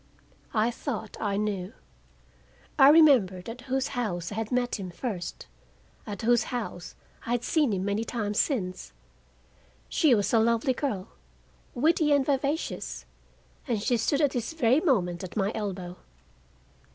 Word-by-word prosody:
I 220 +2 +2
thought 230 -4 -5
I 200 -2 0
knew. 205 -1 -2 1.1
I 270 0 +9
remembered 255 - +5
at 235 +2 -7
whose 265 +1 0
house 190 -9 -3
I - - -5
had 220 -1 -3
met 245 -3 0
him 190 -2 -5
first, 180 -2 -5 0.6
at 205 -1 -6
whose 240 0 +3
house 225 -8 -5 0.3
I 235 - 0
had 245 -1 0
seen 300 -5 +2
him 190 -1 -1
many 205 +2 0
times 210 -3 -2
since. 185 - -2 1.0
She 290 -7 +4
was 205 +1 0
a 225 - +6
lovely 230 +3 +2
girl, 215 -9 -3 0.7
witty 305 +3 +2
and 280 -2 +3
vivacious, 280 +3 -2 0.6
and 235 -5 0
she 240 +4 +1
stood 275 +6 +1
at 290 -3 +3
this 245 +4 -3
very 265 -3 +3
moment 185 - +1
at 185 +3 -7
my 200 0 +1
elbow. 185 -4 -5
230 Hz, 150 wpm, -27 LUFS, 200-265 Hz, 1.1 s, I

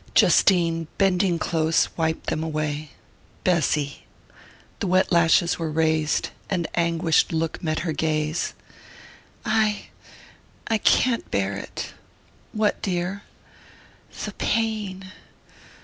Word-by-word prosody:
Justine, 165 -4 +4
bending 190 -2 +2
close, 160 0 +1
wiped 160 -1 -1
them 155 - -1
away. 155 -1 -3 0.5
"Bessy 150 -5 0 0.4
" - - -25
The 200 - -1
wet 185 +1 +2
lashes 170 0 +4
were 165 -1 -2
raised 155 0 +1 0.2
an 180 -4 0
anguished 170 -1 +2
look 160 -1 -2
met 155 -1 -1
her 165 -2 -2
gaze. 155 +1 -1 0.9
"I 215 -2 +1 0.8
I 225 -1 +1
can't 240 +1 +2
bear 100 0 0
it...." 100 - -6 0.6
"What, 215 -1 0
dear?" 185 +1 -2 1.0
"The - - -4
pain.... 205 -4 -2
170 Hz, 105 wpm, -24 LUFS, 155-190 Hz, 1.0 s, Justine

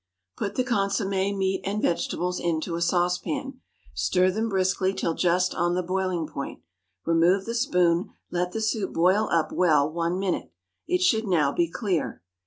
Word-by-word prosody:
Put 200 -1 -4
the 255 - +1
consommé, 200 -3 0
meat, 190 0 0
and 200 +3 -2
vegetables 180 0 -1
into 165 0 -1
a 170 - -2
saucepan. 180 - -1 0.3
Stir 185 0 +2
them 220 +4 -1
briskly 190 0 +1
till 165 - -1
just 180 +2 +1
on 175 0 0
the 180 - 0
boiling 185 -2 -1
point. 140 -2 -7 0.4
Remove 170 +4 +3
the 230 - -3
spoon, 180 -8 +2 0.2
let 180 0 -1
the 220 - -3
soup 215 -2 -1
boil 185 +6 +3
up 160 -2 +1
well 155 -5 +3
one 170 +3 -1
minute. 190 -2 -2 0.4
It 180 0 +1
should 220 +4 +2
now 155 -7 +2
be 170 +2 0
clear. 180 - -2
185 Hz, 165 wpm, -26 LUFS, 170-200 Hz, 0.4 s, Remove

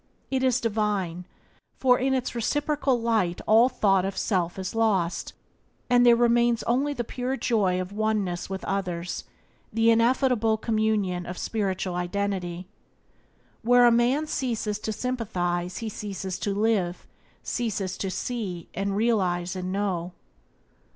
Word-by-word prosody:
It 265 -1 +1
is 255 -1 +3
divine, 205 -6 -1 0.5
for 250 -2 +4
in 265 +1 +1
its 255 -1 -2
reciprocal 280 +2 0
light 220 -7 +1
all 225 +4 +6
thought 195 -6 +2
of 195 0 -3
self 180 -4 0
is 190 -1 -4
lost, 205 -7 0 0.6
and 245 0 +6
there 240 -1 +7
remains 235 0 +3
only 275 +5 +1
the 240 - -2
pure 250 +3 -3
joy 195 -8 +1
of 185 +1 -4
oneness 205 -5 -1
with 190 0 -5
others, 180 -3 -3 0.5
the 225 +1 +4
ineffable 230 -1 +3
communion 215 -5 0
of 180 - -6
spiritual 190 -4 -2
identity. 180 -1 -2 1.0
Where 245 +1 +5
a 240 - +7
man 245 +6 +2
ceases 230 -7 -2
to 220 - -3
sympathize 185 -8 -2
he 225 -2 -4
ceases 195 -3 -5
to 205 - -1
live, 205 -5 0 0.4
ceases 205 -6 -2
to 195 - -2
see 190 -3 -4
and 195 +1 -2
realize 185 -6 +1
and 185 0 -4
know. 185 -3 -2
210 Hz, 135 wpm, -26 LUFS, 185-235 Hz, 1.0 s, there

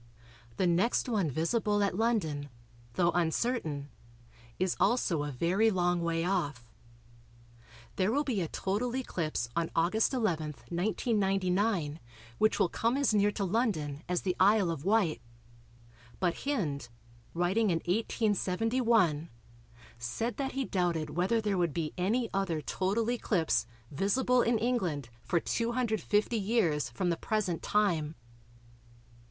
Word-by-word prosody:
The 185 - +2
next 180 +10 +2
one 205 -9 +1
visible 205 - +1
at 200 -3 0
London, 185 -11 0 0.5
though 175 -1 +3
uncertain, 165 - -1 0.7
is 185 -1 0
also 190 -5 +2
a 145 0 -3
very 180 - +2
long 175 -3 +1
way 165 -1 0
off. 145 - -2 1.2
There 190 +2 +2
will 285 +5 +1
be 240 -9 -1
a 165 - -1
total 215 +9 -2
eclipse 165 - -2
on 165 -1 0
August 180 +7 +2
11, 170 - -1 0.2
1999, 195 - 0 0.4
which 215 - +3
will - - +3
come 230 +8 0
as 280 -5 +2
near 205 0 +3
to 200 - -1
London 175 - -1
as 180 -1 0
the 185 -2 0
Isle 195 -2 +4
of 155 -4 -5
Wight, 190 - +2 1.0
but 175 +4 -1
Hind, 150 - -1 0.5
writing 190 +6 +2
in 170 - +2
1871, 210 - +1 0.7
said 120 - -3
that 270 -1 -2
he 270 0 -1
doubted 170 -6 -1
whether 185 +7 +1
there 205 -4 0
would 170 -4 0
be 160 -3 -2
any 220 +7 0
other 190 -5 0
total 200 +9 -1
eclipse 165 - +1 0.2
"visible 245 - +2
in 235 0 +2
England 190 - -1
for 170 - 0
250 230 0 0
years 195 - +1
from 175 +9 -1
the 170 - -1
present 195 -5 -1
time." 165 -7 +1
190 Hz, 130 wpm, -30 LUFS, 165-225 Hz, 1.2 s, Isle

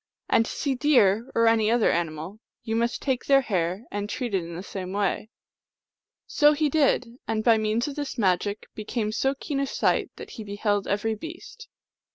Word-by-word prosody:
And 225 - +3
to - - -5
see 280 -3 -1
deer, 245 -5 +3
or 230 - +4
any 225 -1 +4
other 235 -1 +3
animal, 165 +4 -3 0.2
you 225 -1 -2
must 235 +1 -1
take 260 -3 -1
their 275 -1 +6
hair 185 -3 -1
and 205 0 -3
treat 245 -3 -3
it 190 -3 +1
in 165 0 -8
the 180 - -6
same 185 -2 -6
way." 205 +1 -1 1.0
So 295 -1 +4
he 300 0 +1
did; 285 -4 +3 0.2
and 220 -1 -1
by 225 -2 +5
means 215 +4 0
of 285 - -5
this 290 -2 -4
magic 200 0 0
became 215 0 -3
so 270 +5 0
keen 275 0 -3
of 275 -1 -1
sight - - +1
that - - -10
he 220 - -7
beheld 205 0 -1
every 210 +3 0
beast. 345 - -9
220 Hz, 195 wpm, -26 LUFS, 200-265 Hz, 1.0 s, their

